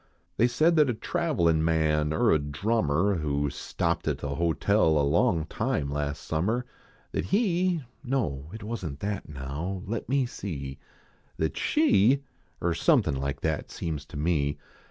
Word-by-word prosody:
They 120 - +5
said 155 +7 +3
that 150 -3 +5
a 120 - 0
travelin 110 - +1
man, 80 -2 +2
er 80 - +3
a 80 - +4
drummer, 85 +4 +1
Who 70 -2 -1
stopped - - -2
at - - +1
the 70 -1 -4
hotel 85 +2 +2
a 70 - +3
long 85 - +2
time 70 -2 -1
last 70 0 -3
summer. 105 +11 0 0.5
That - - -2
he 185 - +1 0.2
no 90 - -2
it 110 +1 -8
wasn 100 -10 -4
t 100 - -6
that 100 -5 -3
now 75 +7 -4
let 110 +3 -4
me 135 -1 +2
see 70 - -6 0.6
That 80 - -1
she 140 - +3 0.4
er 85 -1 +2
something 80 - +3
like 70 +1 -3
that 80 -1 -1
seems 75 -4 -4
to 75 - -8
me. 75 -2 +1
85 Hz, 155 wpm, -27 LUFS, 75-115 Hz, 0.6 s, They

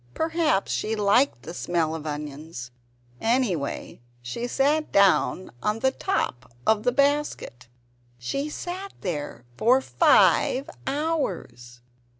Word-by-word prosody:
Perhaps 320 - +1
she 220 +1 -1
liked 205 - +2
the 165 - -7
smell 170 -3 -1
of 160 -1 -5
onions! 150 -3 -6 0.5
Anyway, 225 - -1 0.2
she 180 - -4
sat 295 +5 +1
down 195 -1 +3
upon 210 - 0
the 265 +3 +2
top 200 - -2
of 220 -1 +3
the 245 +2 +2
basket. 280 - 0 0.5
She 275 - -3
sat 370 +5 -6
there 145 -9 -4
for 250 - +4
FIVE 265 0 +3 0.2
HOURS. 180 - -3
210 Hz, 115 wpm, -25 LUFS, -, 0.5 s, for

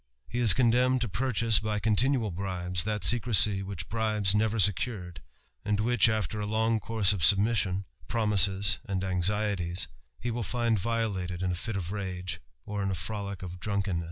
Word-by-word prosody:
He 120 - -4
is 115 -6 +7
condemned 125 +1 +3
to 120 - 0
pu( 125 +7 -2
chase, 115 -1 +4
by 105 0 -2
continual 110 +2 +1
bribes, 90 -1 -3
chat 105 -3 -3
secrecy 105 -1 +3
which 95 -3 -6
bribes 110 -3 0
nev 110 +1 +1
secured, 90 -3 +1 0.4
and 105 0 -1
which, 115 0 +3
after 110 -2 -2
a 105 - -3
long 110 +1 +1
course 110 -2 +2
of 100 - -4
submissJOB 100 0 +3 0.2
promises, 105 -2 +2
and 95 -4 -3
anxieties, 95 -1 0 0.3
he 120 - -3
will 120 +1 -3
find 115 -1 0
violated 95 -5 -2
in 90 - 0
a - - -2
fit 110 +5 -5
of 95 0 -4
n 95 -3 -5 0.4
or 105 -1 -4
in 100 - -1
a 95 - -2
frolick 100 +1 -6
of 90 0 -8
drunkermess. 100 -2 -2
105 Hz, 175 wpm, -28 LUFS, 95-110 Hz, 0.4 s, is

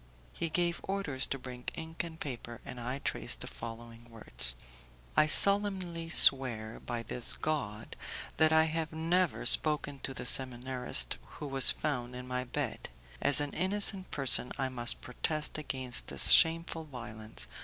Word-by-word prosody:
He 165 - -4
gave 170 +1 -2
orders 190 -9 -3
to 135 - -4
bring 125 -1 -11
ink 160 0 -6
and 165 -1 -11
paper, 120 -3 -8
and 125 - -9
I 125 +3 -5
traced - - -3
the - - -2
following 115 0 -11
words: 105 - 0 0.6
"I 155 - +3
solemnly 190 -3 +3
swear 120 -8 +5
by 120 -2 -6
this 120 +1 -1
God 110 -9 -5 0.4
that 160 0 +3
I 160 0 +4
have 160 0 -4
never 165 +2 -1
spoken 150 -2 +2
to 135 0 -5
the - - -7
seminarist 125 - +4 0.2
who - - -8
was 135 -2 +4
found 125 -5 -2
in 125 0 -9
my 125 0 -4
bed. - - -5 0.3
As 145 - +4
an 145 -1 -4
innocent 195 0 -1
person 135 -3 +3
I 135 -1 -3
must 120 -2 +1
protest 155 +5 -5
against 130 -4 -4
this - - 0
shameful 165 -1 +3
violence. 115 -6 -9
135 Hz, 155 wpm, -30 LUFS, 120-160 Hz, 0.6 s, swear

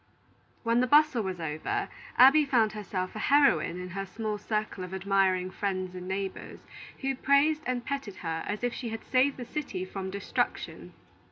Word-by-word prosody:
When 230 0 +2
the 255 - +2
bustle 295 -3 +5
was 190 -3 -4
all 165 - -3
over, 155 0 -2 0.3
Abby 275 +5 +8
found 235 -6 +2
herself 195 -3 -4
a - - -4
heroine 195 - +3
in 180 0 -6
her 195 +2 -4
small 215 +1 -4
circle 210 -3 -2
of 180 +1 -6
admiring 190 -1 +1
friends 185 -2 -2
and 180 0 -7
neighbors, 195 0 -4 0.4
who 270 0 0
praised 280 +4 +3
and 250 -1 -2
petted 275 -8 -4
her 165 0 -2
as 210 +3 -3
if 245 -1 0
she 240 - -5
had 225 0 -6
saved 265 +2 +2
the 245 - -6
city 235 -9 -4
from 190 0 -5
destruction. 200 +1 -3
210 Hz, 180 wpm, -29 LUFS, 185-255 Hz, 0.4 s, Abby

